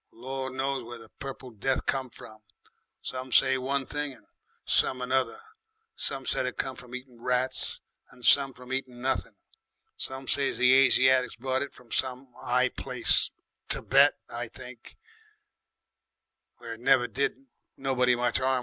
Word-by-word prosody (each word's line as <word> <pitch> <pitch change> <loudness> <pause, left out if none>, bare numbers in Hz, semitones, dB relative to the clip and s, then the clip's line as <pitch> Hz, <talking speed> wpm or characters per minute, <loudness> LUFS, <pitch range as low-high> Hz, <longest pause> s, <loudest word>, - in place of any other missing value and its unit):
Gor' 130 +2 -5
knows 135 +1 -1
where 120 +1 -8
the 115 -1 -13
Purple 135 -2 -7
Death 125 +5 -1
come 135 -1 0
from; 110 -1 -13 0.6
some 130 0 -5
say 130 +1 +5
one 135 +1 0
thing 145 0 -2
and 110 -5 -18 0.4
some 130 - +2
another. 130 - 0 0.6
Some 135 -1 -3
said 130 - 0
it 125 - -5
come 130 -1 -2
from 125 0 -10
eatin' 125 -2 -10
rats 125 +1 -1 0.3
and 125 -1 -10
some 140 -1 +6
from 125 +1 -8
eatin' 130 -2 -3
nothin'. 130 +1 -1 0.6
Some 130 0 -2
say 140 -1 +2
the 125 0 +5
Asiatics 130 -1 +5
brought 130 +2 -1
it 140 - -4
from 120 -2 -18
some 130 0 -2
'I 125 +1 +2
place, - - +2 0.4
Thibet, - - +4
I - - -5
think, - - -12 1.6
where - - -7
it - - -11
never - - +4
did 410 -11 -2 0.3
nobody 125 -2 +2
much 120 0 +1
'arm. 130 0 +2
130 Hz, 150 wpm, -28 LUFS, 125-135 Hz, 1.6 s, some